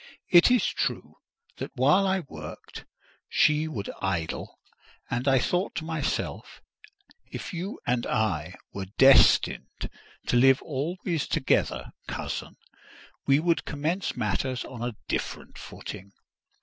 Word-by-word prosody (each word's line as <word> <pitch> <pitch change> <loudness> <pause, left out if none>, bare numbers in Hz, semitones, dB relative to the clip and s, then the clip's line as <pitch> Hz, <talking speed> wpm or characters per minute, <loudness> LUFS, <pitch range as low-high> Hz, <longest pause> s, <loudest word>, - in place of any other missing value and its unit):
It 175 +4 +8
is 250 -1 +4
true, - - -2 0.4
that - - -5
while 150 +10 +4
I 190 0 +1
worked, 75 - -10 0.4
she 150 +1 +3
would 110 -10 -4
idle; 90 -4 -2 0.5
and 120 +3 -1
I 135 -1 +5
thought 180 +9 0
to 160 - -3
myself, 160 -3 -3 0.7
"If 200 - -6
you 180 +4 -4
and 120 -1 0
I 95 -7 -1 0.2
were 95 -1 -5
destined 135 0 +5 0.3
to - - 0
live 135 +2 +6
always 165 +3 -2
together, - - 0 0.2
cousin, - - -4 0.7
we 140 +1 +5
would 170 +1 +1
commence 160 +7 -2
matters 125 +5 -1
on 120 -3 -9
a 120 -1 -3
different - - -4
footing. 100 +1 -9
135 Hz, 125 wpm, -27 LUFS, 115-170 Hz, 0.7 s, It